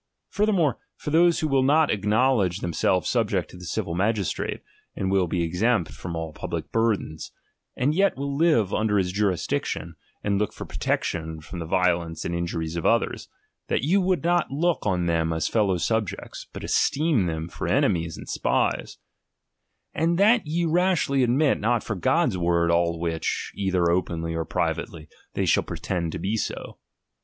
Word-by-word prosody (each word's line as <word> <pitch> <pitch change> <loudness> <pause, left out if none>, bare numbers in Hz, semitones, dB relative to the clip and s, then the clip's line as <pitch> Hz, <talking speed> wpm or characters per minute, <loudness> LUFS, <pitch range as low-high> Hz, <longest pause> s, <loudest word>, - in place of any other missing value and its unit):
Furthermore, 195 - +1 0.2
for 150 - -6
those 170 +2 +4
who 155 - +1
will 135 -2 +2
Hot 155 +1 +4
acknowledge 105 -2 +2
themselves 85 +1 +1
subject - - 0
to - - -11
the 90 - -10
civil 85 - -3
magistrate, 100 +1 -1 0.3
and 95 0 -1
will 95 -2 +2
be 85 +1 -1
exempt 90 +3 +1
from 85 -1 -6
all 80 -1 -4
public - - -5
burthens, 110 -8 -1 0.5
and 140 +4 +2
yet 195 0 +2
will 140 0 -3
live 140 - +3
under 105 -1 +1
his 90 -2 +1
jurisdiction, 90 -3 -1 0.3
id 100 - 0
look 105 - -1
for - - -7
protection 80 -1 -2
from 85 +3 -8
the 80 - -5
violence 85 -2 0
and 85 - -2
in 85 0 -1
luriea 80 0 -3
of 85 - -3
others, - - +1 0.4
that - - 0
you 185 +7 +3
would 180 -5 +1
not 175 0 +2
look 160 0 0
on 90 -3 +1
them 80 -1 +1
as 80 -1 0
fellow 100 -5 +2
subjects, 110 +2 -2
but - - -8
esteem 145 - +2
them 80 0 -3
for - - -5
enemies 85 -1 +1
and - - -10
spies; - - 0 1.0
and 165 +2 +1
that 215 -1 +4
ye 170 +3 0
rashly 170 -5 +2
admit 130 +4 +3
not 115 +2 +1
for 110 - -3
God's 115 - +1
word 85 -1 +2
all 85 0 +2
which, 80 -1 -2
either 95 -3 +1
openly 85 -2 -1
or 80 0 -2
privately, 80 -2 -3 0.3
they - - 0
shall - - +3
pretend 85 -4 -3
to - - -3
be 105 +3 -1
so. - - -5
95 Hz, 170 wpm, -25 LUFS, 85-140 Hz, 1.0 s, those